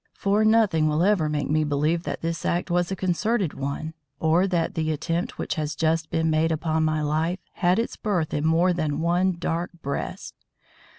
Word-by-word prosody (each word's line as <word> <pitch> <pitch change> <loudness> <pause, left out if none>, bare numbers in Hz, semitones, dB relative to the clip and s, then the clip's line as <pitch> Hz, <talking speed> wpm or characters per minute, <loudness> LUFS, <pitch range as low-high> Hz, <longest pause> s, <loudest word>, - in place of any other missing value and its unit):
For 205 +2 +1
nothing 215 -8 +4
will 155 +2 +1
ever 185 -6 +2
make 150 -1 -1
me 155 +1 +2
believe 150 +3 +1
that - - -4
this 165 0 -3
act 175 +1 -1
was 175 0 +1
a - - 0
concerted 190 0 0
one 140 +3 -4 0.3
or 165 +4 +3
that 170 -3 0
the 160 -1 -1
attempt 170 - -2
which - - -2
has 150 0 -3
just 160 +1 0
been 160 0 0
made 160 +1 +2
upon 160 0 0
my 155 -1 0
life 160 +4 0 0.2
had 180 0 +2
its 230 - -2
birth 180 -7 -1
in 150 - -1
more 165 +3 +3
than 155 -4 -1
one 175 +2 +2
dark 170 +1 -2
breast. 140 +1 -4
165 Hz, 190 wpm, -25 LUFS, 155-180 Hz, 0.3 s, nothing